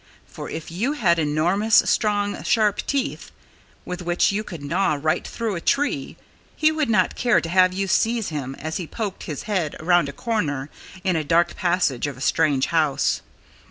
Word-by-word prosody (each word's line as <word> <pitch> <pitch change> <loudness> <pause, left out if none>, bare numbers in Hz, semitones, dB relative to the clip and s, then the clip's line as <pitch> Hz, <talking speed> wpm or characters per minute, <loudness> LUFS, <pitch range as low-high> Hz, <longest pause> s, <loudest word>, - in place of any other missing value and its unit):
For - - -8
if 160 0 -6
you 225 - -1
had 170 - +2
enormous, 175 +8 +1
strong, 205 -2 0
sharp 215 -3 +2
teeth 280 0 -2 0.5
with 180 0 -5
which 175 +2 +2
you 210 +2 -2
could 165 -8 -9
gnaw 160 +1 +1
right 155 +2 0
through 230 -3 -3
a 170 - -4
tree 290 +9 0 0.4
he 310 0 +3
would 310 -4 -1
not 215 - +2
care 240 -5 +3
to - - -5
have 185 +1 +4
you 195 +2 -2
seize 225 +2 +1
him 135 -4 -4
as 155 +1 -4
he 175 - -5
poked 210 -1 -5
his 150 -5 -5
head 185 -8 -1
around 175 -2 +3
a - - -4
corner 150 - -2 0.3
in 185 -3 +1
a 160 - 0
dark 165 +3 +2
passage 175 -8 0
of 140 -3 -6
a - - -12
strange 145 -3 +2
house. 155 -4 +1
175 Hz, 185 wpm, -23 LUFS, 155-210 Hz, 0.5 s, have